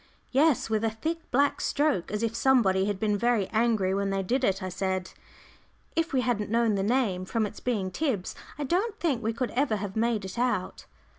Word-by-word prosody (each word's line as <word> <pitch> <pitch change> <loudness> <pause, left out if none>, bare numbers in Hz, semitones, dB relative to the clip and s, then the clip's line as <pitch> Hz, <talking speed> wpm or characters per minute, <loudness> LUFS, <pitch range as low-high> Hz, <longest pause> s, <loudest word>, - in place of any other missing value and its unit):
"Yes, 285 +1 +3
with 220 -1 0
a 225 - +2
thick 320 +10 -4
black 280 +3 +2
stroke, 285 - 0
as 210 +2 -2
if 230 -1 0
somebody 225 -8 +3
had 205 -2 -2
been 210 -1 +1
very 235 -3 +2
angry 220 -4 +1
when 200 0 0
they 195 0 -1
did 255 +8 0
it," 195 -4 +1
I 185 - -3
said. 190 0 -2 0.8
"If 330 0 0
we 260 - +2
hadn't 235 -5 -1
known 230 0 +2
the 195 - 0
name, 205 -4 +1
from 220 +4 -1
its 205 - -7
being 205 -7 -1
Tib's, 225 - -1 0.2
I 295 - -3
don't 390 - 0
think 280 -9 0
we 225 0 0
could 235 +2 -3
ever 260 -3 +1
have 200 -1 -5
made 225 -2 0
it 190 +5 -6
out." 240 -7 -1
225 Hz, 210 wpm, -27 LUFS, 195-255 Hz, 0.8 s, Yes